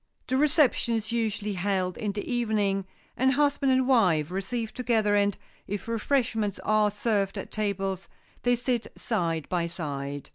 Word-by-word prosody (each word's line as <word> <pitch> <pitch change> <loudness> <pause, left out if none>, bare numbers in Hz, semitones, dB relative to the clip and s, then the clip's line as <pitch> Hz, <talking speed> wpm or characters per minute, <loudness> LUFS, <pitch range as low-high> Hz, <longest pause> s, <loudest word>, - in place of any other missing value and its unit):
The 260 - -1
reception 280 -4 +3
is 220 0 -3
usually 220 -3 -1
held 185 -1 -1
in 210 -2 -2
the 205 - -5
evening, 210 -5 0 0.3
and 265 +1 +3
husband 285 -1 +2
and 260 0 +3
wife 180 - +3
receive 215 +4 -3
together, 220 -4 +1
and, 200 -1 +2 0.3
if 205 +1 -4
refreshments 230 -3 0
are 215 -1 +3
served 205 -2 0
at - - -6
tables, 195 -3 -2 0.3
they 245 0 +3
sit 245 -1 -1
side 165 - -1
by 175 -2 0
side. 145 -4 -5
210 Hz, 150 wpm, -27 LUFS, 190-240 Hz, 0.3 s, reception